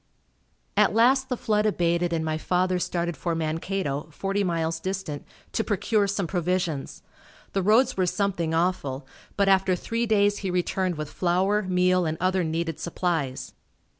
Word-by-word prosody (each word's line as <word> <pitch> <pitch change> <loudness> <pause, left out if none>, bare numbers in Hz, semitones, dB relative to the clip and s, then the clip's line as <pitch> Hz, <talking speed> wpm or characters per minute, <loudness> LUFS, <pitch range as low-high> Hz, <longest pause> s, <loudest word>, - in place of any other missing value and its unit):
At - - +3
last 260 +3 +4
the 250 - -1
flood 210 -1 +1
abated 175 -3 +1
and 160 -1 -1
my 155 0 -1
father 180 +2 +1
started 175 -1 -2
for 170 +4 -2
Mankato, 160 -2 -2
forty 195 +5 -1
miles 165 -2 -1
distant, 185 -6 -4 0.3
to 225 - 0
procure 210 0 +1
some 200 -1 -1
provisions. 175 -4 -2 0.5
The 195 - +1
roads 225 +6 +3
were 185 -1 +2
something 180 -4 0
awful, 160 -6 -1 0.3
but 200 -1 +3
after 190 -1 +4
three 230 +6 -2
days 205 -1 +3
he 195 - -3
returned 180 0 0
with 150 -1 -5
flour, 190 +4 +1
meal 185 -2 +2
and 160 0 -2
other 185 0 +1
needed 165 0 -2
supplies. 165 -6 -2
180 Hz, 155 wpm, -26 LUFS, 165-195 Hz, 0.5 s, last